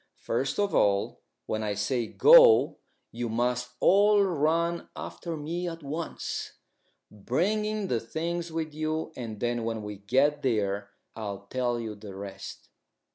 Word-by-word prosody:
"First 135 +4 -2
of 205 -1 +1
all, 100 -1 +2 0.2
when 110 - -2
I 105 -1 -2
say 115 +3 -1
'Go,' - - +7 0.3
you 120 0 -4
must 125 +2 0
all 205 +2 +5
run 170 0 0
after 170 -2 -6
me 170 +4 -3
at 165 -1 -9
once, 155 +4 -4 0.6
bringing 210 - -1
the 120 - 0
things 170 +7 -4
with 160 -1 -3
you, 155 +1 -2
and 115 -4 -6
then 120 -1 -1
when 115 -1 -3
we 105 -1 -6
get 135 +9 +2
there 100 -5 0 0.3
I'll 100 -3 -6
tell 120 -2 0
you 110 -2 -4
the 100 -2 -10
rest." 100 0 -9
130 Hz, 140 wpm, -28 LUFS, 110-170 Hz, 0.6 s, Go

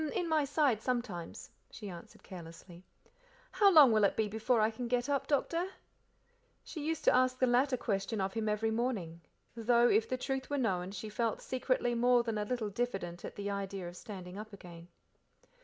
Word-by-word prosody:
"H'm, 310 - -2
in 355 -3 -1
my 310 -3 +2
side 280 -6 +1
sometimes," 220 -9 -4 0.2
she 210 - -9
answered 175 -3 -11
carelessly. 170 0 -11 0.7
"How 405 -2 +5
long 300 -8 +8
will 215 -1 +3
it 200 - +3
be 220 - +1
before 220 +3 +1
I 215 +1 +3
can 240 +2 -5
get 245 +1 0
up, 275 -1 0
Doctor?" 330 +5 0 1.0
She 310 -5 -7
used 320 0 -2
to - - +5
ask 255 0 +3
the 255 - +3
latter 255 +2 +2
question 210 -1 -2
of 190 0 -1
him 220 -1 -1
every 215 +1 0
morning, 215 -9 -2 0.3
though, 235 +1 +4
if 220 0 +2
the 255 - -1
truth 265 +1 -3
were 290 - -1
known, 190 -8 0
she 200 +2 -6
felt 225 +1 -1
secretly 255 -1 -1
more 245 +1 +4
than 225 -2 -2
a 210 - -1
little 220 -2 -2
diffident 195 -6 -3
at - - -7
the 205 0 -3
idea 195 -2 -4
of 175 - -9
standing 185 -2 -8
up 215 +1 -8
again. 170 -3 -11
225 Hz, 195 wpm, -32 LUFS, 195-255 Hz, 1.0 s, long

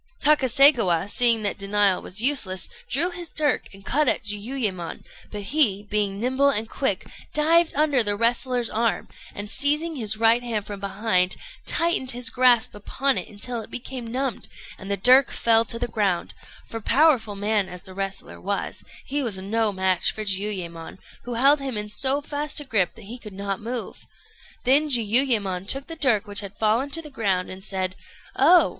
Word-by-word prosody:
Takaségawa, 260 - +4
seeing 235 -3 +3
that 205 - -1
denial 200 -1 +1
was 195 +5 0
useless, 205 -10 +1 0.2
drew 335 +7 +1
his 345 -1 -7
dirk 295 -4 -1
and 195 0 -16
cut 300 +4 +1
at - - 0
Jiuyémon; 210 -4 -4 0.3
but 210 -1 -5
he, 205 -4 +2
being 205 -2 0
nimble 260 +4 +2
and 225 -4 -1
quick, 215 -6 -1 0.3
dived 325 +3 +4
under 290 -3 +3
the 205 -2 0
wrestler's 240 +2 0
arm, 230 +1 -1 0.3
and 205 +1 -6
seizing 300 +8 +1
his 220 -5 -1
right 230 +2 +4
hand 225 -4 -3
from 205 -1 -7
behind, 195 -2 0 0.3
tightened 335 -6 +1
his 250 +1 -2
grasp 250 -3 +3
upon 265 +6 -1
it - - -8
until 230 +3 -4
it - - -11
became 250 -1 -6
numbed, 260 -2 -3 0.3
and 190 - -9
the 200 - 0
dirk 255 +6 +5
fell 225 -1 +3
to 230 - -1
the 245 - -2
ground; 200 -6 -1 0.3
for, 225 - -7
powerful 260 -5 +3
man 205 -1 0
as 180 0 -9
the 190 - -12
wrestler 195 0 -6
was, 200 +1 -4 0.2
he 290 +1 -1
was 225 -7 -3
no 210 +3 0
match 190 -2 +1
for 215 - -6
Jiuyémon, 190 -5 -3 0.3
who 245 -1 -4
held 275 +5 +4
him 265 -5 -4
in 210 0 -4
so 270 +6 +3
fast 295 0 -3
a - - -5
grip 215 -9 +1
that 225 - -13
he 240 +5 -8
could 210 -4 -10
not 195 0 -4
move. 235 +2 -6 0.6
Then 285 +4 +3
Jiuyémon 220 -6 +1
took 270 +4 0
the 330 - -8
dirk 245 -9 +2
which 205 -1 0
had 200 -1 -7
fallen 225 +6 +1
to 330 +3 -3
the 300 - -10
ground, 195 -8 -1
and 190 +1 -9
said: 185 -2 -3 0.4
"Oh! 340 +6 +5
225 Hz, 180 wpm, -24 LUFS, 200-270 Hz, 0.6 s, dirk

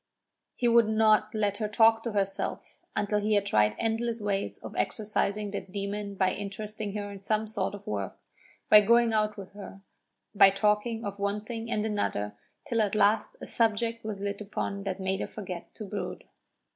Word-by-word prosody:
He 245 - +1
would 235 -2 +5
not 215 0 +3
let 205 -2 +1
her 215 - -1
talk 225 +1 +5
to 230 -1 -4
herself 195 -1 -2 0.2
until 210 0 +1
he 210 +1 +1
had 200 -1 +2
tried 105 - +3
endless 230 +1 -1
ways 200 -2 -1
of - - -9
exorcising 210 -1 0
that 195 -2 -6
demon 200 +1 -4
by 185 -1 +2
interesting 205 +1 -5
her 205 -1 -4
in 200 -1 -9
some 215 +2 0
sort 205 -2 -2
of 205 - -12
work, 100 -2 -3 0.5
by 210 - +9
going 235 +2 +4
out 215 -1 +1
with 195 -2 -9
her, 200 -1 -10 0.5
by 200 -2 +8
talking 210 +3 +1
of 200 0 -5
one 200 +1 -1
thing 230 0 -5
and 215 -2 0
another 105 - -1 0.3
till 235 -6 +1
at 210 -1 0
last 210 +1 +3
a - - -5
subject 230 0 0
was 210 -2 -5
lit 200 0 -3
upon 200 -1 -4
that 195 -1 -3
made 190 0 -1
her - - -2
forget 185 -5 -7
to 215 - -7
brood. 205 +1 -5
210 Hz, 185 wpm, -29 LUFS, 200-220 Hz, 0.5 s, by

